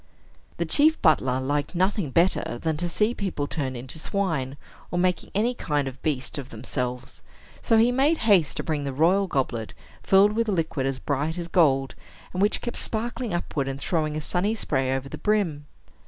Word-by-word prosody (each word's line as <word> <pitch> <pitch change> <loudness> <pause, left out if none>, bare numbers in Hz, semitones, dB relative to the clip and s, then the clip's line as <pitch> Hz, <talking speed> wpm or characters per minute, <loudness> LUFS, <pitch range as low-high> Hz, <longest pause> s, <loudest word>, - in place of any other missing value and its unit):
The - - 0
chief 310 +2 +4
butler 130 -6 +3
liked 145 +5 -2
nothing 185 -2 +1
better 165 -5 +1
than 160 +2 -1
to 175 +2 -1
see 210 +7 +1
people 190 -10 -3
turned 135 -4 -3
into 130 +6 -6
swine, 160 -8 -2 0.3
or 175 - -3
making 180 0 0
any 230 +5 +2
kind 145 - -1
of 135 - -4
a - - -21
beast 145 -2 -2
of 135 - -8
themselves; 125 +2 -5 0.4
so 225 - +3
he 230 +2 +5
made 280 +6 +3
haste 190 -9 +4
to - - -2
bring 150 -3 -2
the 140 -1 -3
royal 180 +8 +3
goblet, 125 -7 -2 0.3
filled 195 +2 +5
with 230 0 0
a - - +1
liquid 160 -6 -1
as 135 -1 -2
bright 145 +5 -2
as 170 -1 -4
gold, 135 -6 +3 0.4
and 185 - -2
which 205 +2 +2
kept 240 - -3
sparkling 235 +1 -1
upward, 155 -5 -2
and 135 0 -4
throwing 155 -3 -1
a - - -3
sunny 185 +8 0
spray 135 -10 0
over 135 0 -2
the - - -8
brim. 180 -9 0
160 Hz, 195 wpm, -25 LUFS, 135-200 Hz, 0.4 s, he